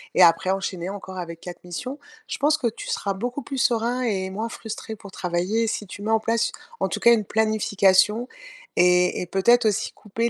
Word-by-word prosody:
et - - +5
après 170 +2 +5
enchaîner 190 -2 -3
encore 190 -2 -8
avec 170 -1 -7
4 180 -1 -9
missions». 250 - -5 0.3
Je - - -4
pense 300 +2 +3
que 250 -6 0
tu 225 - -6
seras 200 - -1
beaucoup 245 +7 -3
plus 270 +2 -5
serein 240 0 +1
et 190 -5 -1
moins 220 +4 -3
frustré 220 0 -7
pour 200 -1 -12
travailler 180 +6 0
si 210 -2 -3
tu 205 - -9
mets 220 - -1
en 220 - +4
place, 230 +1 0 0.3
en - - +2
tout - - -3
cas, 235 - +6
une 215 -3 +1
planification 210 +1 +3 0.5
et 180 0 +4
et 180 - -4
peut-être 235 +7 +4
aussi 205 - 0
couper 230 +3 -2
210 Hz, 205 wpm, -24 LUFS, 185-230 Hz, 0.5 s, cas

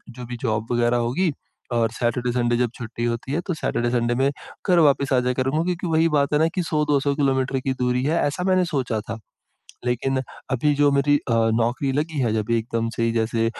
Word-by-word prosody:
जो 125 - -8
भी 120 0 -6
जॉब 110 -2 -1
वगैरह 120 0 +2
होगी 130 +9 +1 0.4
और 115 -2 +1
सैटरडे, 120 +1 -1
संडे 120 -1 +1
जब 125 0 +1
छुट्टी 120 -1 -6
होती 120 +3 -3
है 165 - 0
तो 180 - 0
सैटरडे, 120 -6 -1
संडे 120 -1 +1
में 135 +2 +2 0.4
घर 180 -1 +5
वापिस 140 -3 +3
आ 130 - +4
जाया 125 0 0
करूँगा। 135 +5 0
क्योंकि 180 0 -2
वही 160 0 +3
बात 140 +1 0
है 150 - +3
ना 160 - +4
कि, 185 - +1
100-200 150 -3 +1
किलोमीटर 135 -2 +1
की 130 +1 -1
दूरी 125 0 0
है 155 +5 +1
ऐसा 145 +5 -2
मैंने 185 -1 +3
सोचा 130 -9 -1
था। 110 0 -4 0.7
लेकिन 130 +2 0 0.3
अभी 145 +3 +2
जो 145 0 +4
मेरी 140 +1 +3
अ, 125 - -3 0.2
नौकरी 120 +4 0
लगी 150 +2 -2
है 120 -4 +1
जब 110 0 -2
एकदम 115 0 -1
से 115 0 +1
जैसे 115 0 0
130 Hz, 210 wpm, -23 LUFS, 120-145 Hz, 0.7 s, घर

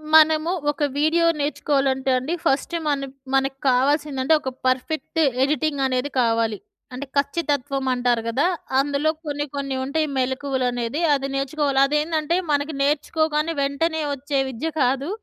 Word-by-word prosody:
మనము 315 +1 +5 0.2
ఒక 295 +1 -4 0.2
వీడియో 330 +3 +3
నేర్చుకోవాలంటే 275 -2 0
అండి. 265 +7 -2
ఫస్ట్ 275 +5 +1
మన 275 -2 0 0.3
మనకు 270 0 +1
కావాల్సిందంటే, 280 +2 +2
ఒక 260 - -3 0.2
పర్ఫెక్ట్ 305 +5 -1 0.2
ఎడిటింగ్ 300 0 0
అనేది 255 +2 -1
కావాలి. 225 -2 +1 0.4
అంటే 260 +3 -5
ఖచ్చితత్వం 280 -2 -1
అంటారు 245 -2 +1
కదా! 265 +8 +1 0.3
అందులో 285 +2 +1 0.2
కొన్ని 290 0 -2
కొన్ని 275 -1 -3
ఉంటాయి 305 +3 0
మెళకువలనేది 260 0 -1
అది 275 -1 0
నేర్చుకోవాలి. 275 0 0
అది 295 +2 -1
ఏందంటే 315 +1 0 0.2
మనకి 290 +2 0
నేర్చుకోగానే 305 +2 0
వెంటనే 315 +4 0
వచ్చే 280 +1 -2
విద్య 270 +7 -3
కాదు. 270 +5 +1
280 Hz, 130 wpm, -23 LUFS, 265-305 Hz, 0.4 s, మనము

